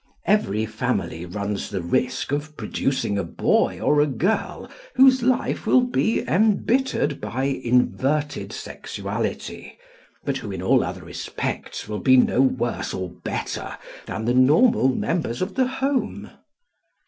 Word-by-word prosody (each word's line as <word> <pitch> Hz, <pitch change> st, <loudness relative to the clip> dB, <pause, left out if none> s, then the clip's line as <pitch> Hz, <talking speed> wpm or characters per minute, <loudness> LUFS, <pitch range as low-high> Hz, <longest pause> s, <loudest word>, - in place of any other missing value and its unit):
Every 110 Hz, -, +2 dB
family 90 Hz, -5 st, -2 dB
runs 100 Hz, +2 st, -3 dB
the 95 Hz, -, -3 dB
risk 130 Hz, +10 st, -1 dB
of 150 Hz, +1 st, -3 dB
producing 130 Hz, -7 st, -1 dB
a -, -, -1 dB
boy 85 Hz, -, +1 dB
or 150 Hz, 0 st, +3 dB
a 150 Hz, -, +3 dB
girl 165 Hz, -, -1 dB, 0.3 s
whose 260 Hz, 0 st, +6 dB
life 255 Hz, +1 st, 0 dB
will 255 Hz, -, +6 dB
be 245 Hz, -2 st, 0 dB
embittered 210 Hz, -, +1 dB
by 115 Hz, +5 st, -3 dB
inverted 135 Hz, +3 st, 0 dB
sexuality, -, -, -5 dB, 0.5 s
but -, -, 0 dB
who -, -, -6 dB
in -, -, -5 dB
all -, -, +4 dB
other -, -, -5 dB
respects -, -, -5 dB
will 105 Hz, -1 st, -3 dB
be 130 Hz, 0 st, +5 dB
no 125 Hz, 0 st, +4 dB
worse 125 Hz, -3 st, 0 dB
or 95 Hz, -1 st, -4 dB
better -, -, -5 dB, 0.3 s
than 110 Hz, -, -4 dB
the 120 Hz, -, +2 dB
normal 140 Hz, -, +5 dB
members 135 Hz, -1 st, -1 dB
of 185 Hz, +1 st, -2 dB
the 260 Hz, -1 st, +2 dB
home. 265 Hz, +1 st, -2 dB
135 Hz, 135 wpm, -23 LUFS, -, 0.5 s, whose